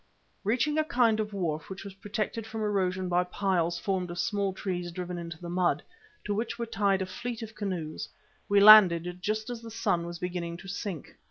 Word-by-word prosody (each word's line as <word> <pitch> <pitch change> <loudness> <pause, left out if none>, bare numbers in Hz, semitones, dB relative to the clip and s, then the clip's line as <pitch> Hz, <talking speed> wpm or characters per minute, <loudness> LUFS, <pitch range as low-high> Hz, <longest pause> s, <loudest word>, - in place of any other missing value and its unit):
Reaching 255 +9 +1
a - - +3
kind 245 -9 +2
of 215 -1 -2
wharf 175 -3 -3
which 190 -1 -7
was 200 - -8
protected 215 +3 -4
from 225 0 -5
erosion 190 -3 0
by 180 0 +2
piles 180 -2 0
formed 185 -2 -1
of 175 - -6
small 200 +1 0
trees 180 -2 -4
driven 180 0 -5
into 170 -1 -7
the 175 - -7
mud, 175 0 +1 0.4
to 205 - 0
which 225 +3 -2
were 235 - -2
tied 200 -3 +1
a - - -3
fleet 235 +5 -5
of 220 0 -8
canoes, 185 -7 -4 0.4
we 200 0 +5
landed 180 -4 +8
just 215 +4 -2
as 235 -2 -6
the 230 - -9
sun 195 -6 0
was 170 0 -6
beginning 175 -1 -4
to 190 - -12
sink. 195 -4 -5
195 Hz, 200 wpm, -29 LUFS, 175-215 Hz, 0.4 s, landed